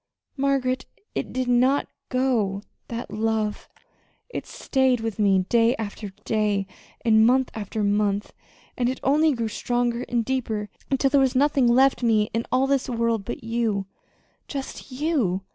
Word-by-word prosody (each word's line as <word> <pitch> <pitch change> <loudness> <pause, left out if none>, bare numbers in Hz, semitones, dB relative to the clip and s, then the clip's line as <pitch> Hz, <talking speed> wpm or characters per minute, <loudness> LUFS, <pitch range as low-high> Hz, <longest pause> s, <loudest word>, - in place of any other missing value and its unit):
"Margaret, 270 -2 0 0.3
it - - -3
did 255 -1 -2
not 255 +3 +3 0.2
go 230 -7 0 0.2
that 235 -2 -6
love. 215 0 -1 0.6
It - - -6
stayed 260 -2 +1
with 225 -2 -4
me 195 -3 +3
day 235 +2 +3
after 210 -2 -5 0.2
day, 210 -3 +1 0.4
and 220 -1 +5
month 255 +3 +3
after 215 0 -3
month, 205 0 0 0.4
and 245 -1 +1
it 260 - -3
only 305 +3 +4
grew 230 -3 -2
stronger 240 +2 -1
and 235 -2 0
deeper 220 -5 -2 0.2
until 270 0 +2
there 280 -1 +5
was 265 -1 +2
nothing 275 -1 +3
left 260 +3 +4
me 220 -3 +2
in 230 +1 -1
all 255 +1 +3
this 275 -1 0
world 230 -3 0
but - - -6
you 225 -4 -1 0.6
just 275 -1 -6
you. 255 - 0
235 Hz, 150 wpm, -24 LUFS, 215-260 Hz, 0.6 s, and